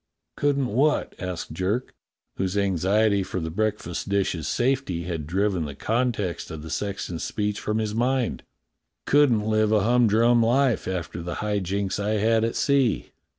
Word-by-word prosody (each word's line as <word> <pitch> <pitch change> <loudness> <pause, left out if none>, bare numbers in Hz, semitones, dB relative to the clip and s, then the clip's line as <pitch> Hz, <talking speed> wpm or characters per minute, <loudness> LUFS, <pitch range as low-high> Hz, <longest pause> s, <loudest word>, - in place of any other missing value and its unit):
"Couldn't 140 -2 +1
what?" 135 +7 +1
asked 90 -2 -5
Jerk, 95 +9 -2 0.4
whose 95 +1 -1
anxiety 100 +2 +2
for 95 0 -3
the 80 -1 -4
breakfast 105 -2 -2
dishes' 95 -7 0
safety 120 -9 0
had 80 -4 -4
driven 95 -1 0
the 70 -2 -7
context 110 - -1
of 80 -1 -7
the 80 - -8
sexton's 95 -4 -3
speech 105 -1 -2
from 105 0 -2
his 110 -1 -1
mind. 125 +2 0 0.3
*' - - -56
Couldn't 130 -7 +4
live 110 0 +2
a 105 -1 +4
humdrum 120 0 +4
life 125 +2 +2
after 85 -2 -4
the 85 +1 -4
high 105 -1 -1
jinks 100 +1 -2
I 105 +1 0
had 110 +1 +2
at 115 - -1
sea." 140 -5 +1
105 Hz, 160 wpm, -25 LUFS, 90-115 Hz, 0.4 s, Couldn't